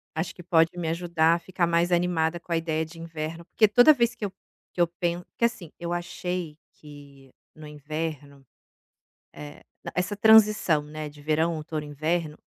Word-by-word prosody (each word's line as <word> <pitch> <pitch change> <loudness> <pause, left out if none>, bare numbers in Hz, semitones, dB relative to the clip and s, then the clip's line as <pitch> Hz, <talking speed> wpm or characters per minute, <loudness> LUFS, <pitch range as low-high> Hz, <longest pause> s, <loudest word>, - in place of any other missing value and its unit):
Acho 160 +2 -3
que 180 - -12
pode 165 -1 +3
me 170 -2 -3
ajudar 165 -1 +2
a - - -5
ficar 175 0 -1
mais 170 +1 +1
animada 175 -1 +1
com 170 0 -9
a - - +3
ideia 160 -1 -1
de 165 +1 -13
inverno 165 0 -6
porque 215 - +3
toda 245 +8 +7
vez 235 -2 +1
que 220 - -6
eu 195 - -3 0.4
que - - -4
eu 175 - +5
penso, 175 +1 -3
que - - 0
assim, 225 -9 -1
eu 170 0 -4
achei 175 -2 -4 0.2
que 140 -2 -14 0.2
no 155 -1 -12
inverno, 150 -1 -6 0.9
eh, 75 -1 -11 0.3
essa 180 +3 -1
transição, 210 -7 +5
né, 150 0 -7
de 145 0 -15
verão, 160 +2 +1
outono, 155 -1 -5
inverno, 155 +2 -2
165 Hz, 180 wpm, -26 LUFS, 155-175 Hz, 0.9 s, toda